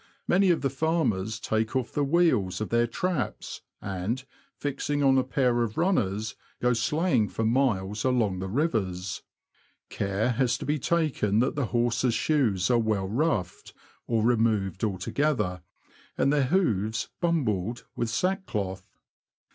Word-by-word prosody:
Many 190 +1 +4
of 170 - +3
the 135 - 0
farmers 130 - 0
take 110 +2 -1
off 130 -2 -1
the 145 - 0
wheels 140 - +2
of 110 - -3
their 120 0 +2
traps, 165 +3 -3 0.2
and, 100 +7 -3 0.3
fixing 145 +1 -2
on 135 -1 +5
a - - +2
pair 125 -2 +1
of 110 -2 -2
runners, 110 - 0 0.2
go 125 0 +2
sleighing 125 - +1
for 110 - -2
miles 110 -4 +1
along 115 -8 +1
the 95 - -3
rivers. 95 - -1 0.7
Care 100 +5 0
has 120 -1 +1
to - - -7
be 150 +1 0
taken 140 -10 +1
that 125 - +1
the 140 -5 -1
horses' 120 0 +1
shoes 115 - +1
are 120 - +4
well 110 -4 0
roughed, 105 - -1 0.3
or 115 -2 +1
removed 110 -5 +1
altogether, 105 - 0 0.6
and 140 - +3
their 145 -2 +3
hoofs 115 - 0
"bumbled" 120 - -1
with 120 - -1
sackcloth. 110 - -2
120 Hz, 140 wpm, -27 LUFS, 105-145 Hz, 0.7 s, on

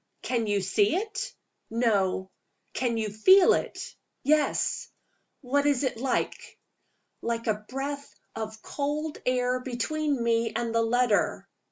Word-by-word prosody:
"Can 235 -3 0
you 205 -1 +1
see 200 - +2
it?" 435 +5 -3 0.3
"No." 200 -5 +1 0.4
"Can 240 -3 0
you 215 -2 -1
feel 370 - +6
it?" - - -3 0.3
"Yes!" 300 +1 +1 0.5
"What 285 +2 +1
is 285 -2 +2
it 260 -4 -1
like?" 265 +1 -2 0.6
"Like 230 0 -2
a 210 -1 -1
breath 280 +2 -5 0.2
of 220 0 -6
cold 295 +2 -3
air 250 0 +2
between 270 +2 -1
me 230 -1 +1
and 235 -1 -1
the 230 - +3
letter." 230 -1 +1
245 Hz, 130 wpm, -27 LUFS, 220-285 Hz, 0.6 s, feel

